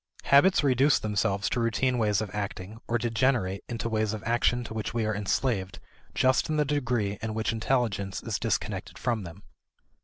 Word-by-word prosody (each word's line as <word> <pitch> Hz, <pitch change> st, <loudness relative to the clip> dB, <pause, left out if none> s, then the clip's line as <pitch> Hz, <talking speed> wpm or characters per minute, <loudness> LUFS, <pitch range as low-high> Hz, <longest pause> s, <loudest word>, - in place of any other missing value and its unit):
Habits 145 Hz, +5 st, +5 dB
reduce 135 Hz, +1 st, +4 dB
themselves 105 Hz, -1 st, 0 dB
to 120 Hz, -, 0 dB
routine 120 Hz, +2 st, +1 dB
ways 105 Hz, -2 st, +2 dB
of 105 Hz, -, -5 dB
acting, 105 Hz, +1 st, -5 dB
or 120 Hz, -, +1 dB
degenerate 115 Hz, -4 st, 0 dB
into 115 Hz, -1 st, -3 dB
ways 110 Hz, -1 st, 0 dB
of 110 Hz, -, -6 dB
action 120 Hz, +1 st, +1 dB
to 115 Hz, -, -7 dB
which 110 Hz, +3 st, -4 dB
we 115 Hz, -2 st, +1 dB
are 110 Hz, -, 0 dB
enslaved 105 Hz, -1 st, -1 dB, 0.4 s
just 130 Hz, +3 st, +2 dB
in 155 Hz, -, 0 dB
the 150 Hz, -, +2 dB
degree 120 Hz, -8 st, -1 dB
in 110 Hz, -1 st, -3 dB
which 110 Hz, 0 st, 0 dB
intelligence 110 Hz, -5 st, -1 dB
is -, -, -2 dB
disconnected -, -, -2 dB
from 115 Hz, -5 st, -1 dB
them. 85 Hz, +4 st, -11 dB
110 Hz, 180 wpm, -27 LUFS, 105-125 Hz, 0.4 s, Habits